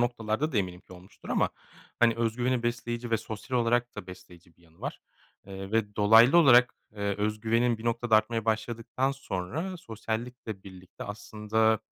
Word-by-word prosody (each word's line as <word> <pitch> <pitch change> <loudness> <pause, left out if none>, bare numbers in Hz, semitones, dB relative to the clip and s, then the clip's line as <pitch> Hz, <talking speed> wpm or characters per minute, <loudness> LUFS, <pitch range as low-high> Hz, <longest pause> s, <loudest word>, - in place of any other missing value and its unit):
noktalarda 120 +4 -1
da - - -1
eminim 90 -2 -3
ki - - -17
olmuştur 90 +1 -14
ama, - - +1 0.5
hani, 115 -1 +5
öz 115 -1 -1
güveni 125 0 0
besleyici 120 0 -3
ve 115 - +3
sosyal 110 +3 -4
olarak 120 0 +1
da 105 - -7
besleyici 90 -2 -14
bir - - -27
yanı 80 -1 -24
var. - - -5 0.5
Eee, 95 0 -8
ve 105 -2 0
dolaylı 115 +7 +7
olarak, 125 -6 +6 0.2
eee, 100 -1 -2
öz 105 +1 -1
güvenin 115 +1 +2
bir 115 - -10
noktada 115 -1 +2
artmaya 115 +1 0
başladıktan 115 +4 -1
sonra 135 - -4
sosyallikle 115 - -5
birlikte 95 -1 -11
aslında, 105 +1 0
110 Hz, 165 wpm, -28 LUFS, 105-120 Hz, 0.5 s, dolaylı